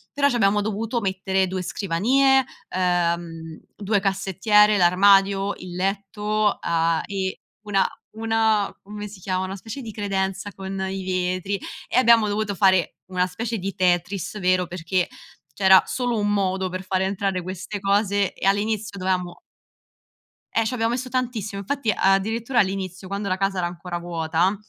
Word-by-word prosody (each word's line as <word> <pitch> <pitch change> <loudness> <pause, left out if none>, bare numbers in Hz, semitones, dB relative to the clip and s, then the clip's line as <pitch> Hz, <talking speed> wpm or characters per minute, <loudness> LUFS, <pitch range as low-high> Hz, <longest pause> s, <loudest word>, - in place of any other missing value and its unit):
Però 280 0 +3
ci 250 - -1
abbiamo 205 -2 +3
dovuto 220 +3 -2
mettere 190 -1 0
2 185 0 -3
scrivanie, 255 +10 +2 0.2
ehm, 170 -3 -1 0.2
2 205 0 0
cassettiere, 195 +2 +3
l'armadio, 195 +2 +4
il 180 -1 -9
letto, 205 +2 0
a 165 -1 +1
e 190 -2 -3 0.2
una 205 -2 +1 0.3
una 220 -2 +1
come 210 +1 -7
si 200 -1 -12
chiamano? 185 0 -2
Una 190 - -5
specie 225 +7 -7
di 225 - -7
credenza 195 -1 -2
con 190 0 -6
i 190 0 -4
vetri, 185 +1 -1 0.3
e - - -1
abbiamo 235 -3 +6
dovuto 205 0 -1
fare 190 -3 +3
una 180 -1 0
specie 225 +5 -4
di 195 0 -4
Tetris 180 +2 0
vero, 185 -1 +2
perché 180 0 -1 0.5
c'era 190 -1 +6
solo 245 -2 -1
un 205 0 +1
modo 190 -2 0
per 185 +1 -5
far 185 0 -1
entrare 190 -1 -1
queste 190 +3 -5
cose 200 0 +1
e - - -6
all'inizio 205 0 0
dovevamo 185 -1 -1 1.2
Eh, 225 - +3
ci 245 +3 -1
abbiamo 225 -1 0
messo 255 +1 -3
tantissimo, 235 -6 -2
infatti, 235 +2 -1
addirittura 220 +6 +1
all'inizio, 190 -1 -1
quando 200 +1 -3
la 185 -1 0
casa 195 0 0
era 180 - 0
ancora 175 0 -5
vuota, 170 +2 0
195 Hz, 155 wpm, -23 LUFS, 185-210 Hz, 1.2 s, abbiamo